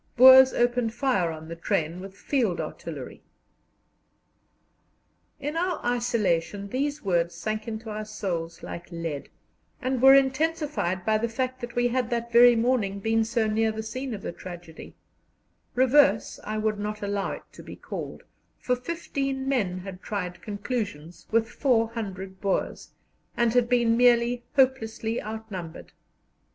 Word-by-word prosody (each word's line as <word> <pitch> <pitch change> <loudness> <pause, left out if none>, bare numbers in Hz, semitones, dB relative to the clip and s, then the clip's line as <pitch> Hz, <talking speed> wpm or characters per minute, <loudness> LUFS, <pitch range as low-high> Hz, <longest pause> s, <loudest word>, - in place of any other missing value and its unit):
Boers 260 +1 +9
opened 240 -1 +1
fire 240 -10 +1
on 160 0 -7
the 165 - -6
train 165 0 -1
with 190 +1 -9
field 230 -11 0
artillery." - - -7 2.2
In 295 +3 -4
our 355 +1 0
isolation 210 -6 0
these 285 +5 -2
words 175 -3 +1
sank 215 +5 -4
into 220 0 -5
our 215 0 -4
souls 170 -6 -4
like 170 +1 -8
lead, 165 -4 -5 0.5
and 255 -2 -1
were 270 +1 +9
intensified 275 - +1
by 215 0 +2
the 235 +1 -1
fact 255 +2 -3
that 240 0 -7
we 245 0 +2
had 250 -1 -1
that 235 -1 -2
very 240 +1 +8
morning 225 -4 +1
been 225 +2 +2
so 225 0 0
near 220 +1 +1
the 220 0 -5
scene 255 +2 -4
of 200 - -10
the - - -3
tragedy 175 -2 -10 0.8
"reverse" 255 -4 +4
I 215 +1 -3
would 215 -1 -1
not 210 0 -4
allow 200 -1 -1
it - - -8
to - - -12
be - - -10
called, - - -7 0.3
for 250 - 0
fifteen 275 -2 -3
men 195 -10 0
had 185 0 -9
tried 180 -4 -4
conclusions 205 - -5
with 225 0 +2
400 225 -7 -1
Boers, 195 -2 -2 0.5
and 235 -1 +2
had 245 -1 +3
been 235 -2 +3
merely 240 0 +3
hopelessly 230 -4 +1
outnumbered. 210 -6 -7
225 Hz, 145 wpm, -26 LUFS, 195-250 Hz, 2.2 s, Boers